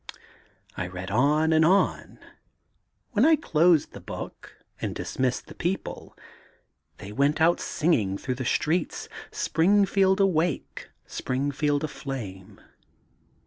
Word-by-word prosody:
'^I 90 -1 -3
read 90 +1 -6
on 150 +7 +3
and 160 0 +5
on. 185 +5 +2 0.9
When 225 -2 +2
I 320 +2 +6
closed 170 - +3
the - - -10
book - - -9 0.2
and - - -3
dismissed 130 -1 -2
the - - -12
people, 180 +3 -4 0.8
they 100 - -9
went 140 +6 +1
out 165 +2 +4
sing 170 +3 0
ing 100 -7 0
throngh 130 +2 -4
the 130 - -3
streets 160 +7 0 0.2
^Springfield 190 +2 +3
Awake^ 175 -6 0 0.2
Springfield 145 +3 -1
Aflame.' 115 -11 -6
155 Hz, 115 wpm, -26 LUFS, 130-175 Hz, 0.9 s, I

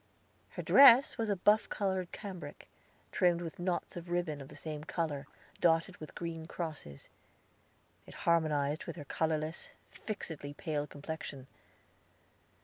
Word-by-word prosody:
Her - - -6
dress 270 -2 +8
was 225 -1 0
a 205 - +2
buff 210 +4 +3
colored 190 -3 -1
cambric, 190 -4 -8 0.4
trimmed 175 -2 +3
with 170 +3 -6
knots 175 0 -2
of 175 0 -7
ribbon 175 -4 -1
of 135 - -9
the - - -13
same 150 -2 -5
color, 150 -4 -3 0.3
dotted 165 +2 +2
with 155 - -10
green 165 -2 -5
crosses. 155 - -6 1.0
It - - -12
harmonized 155 -3 +2
with - - -6
her 150 -4 -8
colorless, 155 +2 -2 0.2
fixedly 160 -9 -6
pale 150 -1 -2
complexion. 145 -3 -7
165 Hz, 135 wpm, -33 LUFS, 150-180 Hz, 1.0 s, dress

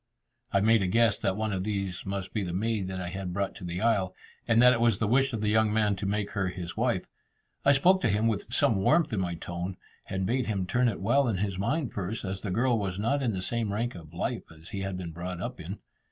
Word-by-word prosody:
I 100 - +3
made 110 +1 +5
a 95 - +1
guess 110 +1 +3
that 95 +1 0
one 110 -1 -1
of 95 -1 -1
these 100 -3 -3
must 95 -1 -4
be 105 - 0
the 90 -2 -4
maid 105 0 0
that 95 0 -4
I 90 -1 -3
had 95 -1 -4
brought 100 +1 -1
to - - -10
the 90 +1 -4
isle, 100 -5 +1 0.3
and 115 - +4
that 125 +1 +8
it 115 - -1
was 115 -4 +4
the 110 - 0
wish 135 +5 +3
of 115 -3 -3
the 105 - +1
young 110 0 +3
man 105 -2 +2
to 100 0 -3
make 105 0 -1
her 95 -3 0
his 90 -2 -5
wife. - - 0 0.6
I 140 - +6
spoke 185 +7 +4
to 115 - +2
him 105 +2 +1
with 110 -3 -1
some 110 - +3
warmth 120 - +3
in 105 - +1
my 90 -2 -1
tone, 85 +2 -5 0.3
and 95 0 -1
bade 125 +5 0
him 100 -4 -1
turn 120 +6 +2
it 100 - -5
well 130 +7 +3
in 110 -5 0
his 95 -1 -2
mind 140 +6 -1
first, 100 +3 -3
as 95 0 -4
the 105 - -4
girl 120 +4 +2
was 95 -2 -2
not 115 +8 +1
in 125 -4 +1
the 95 -1 -3
same 115 -2 -1
rank 115 +4 -1
of 80 -3 -11
life 85 - -3
as 80 +2 -13
he 100 - -4
had 95 -1 -3
been 90 -2 -5
brought 90 +2 -5
up - - -5
in. - - -6
100 Hz, 270 wpm, -28 LUFS, 95-115 Hz, 0.6 s, that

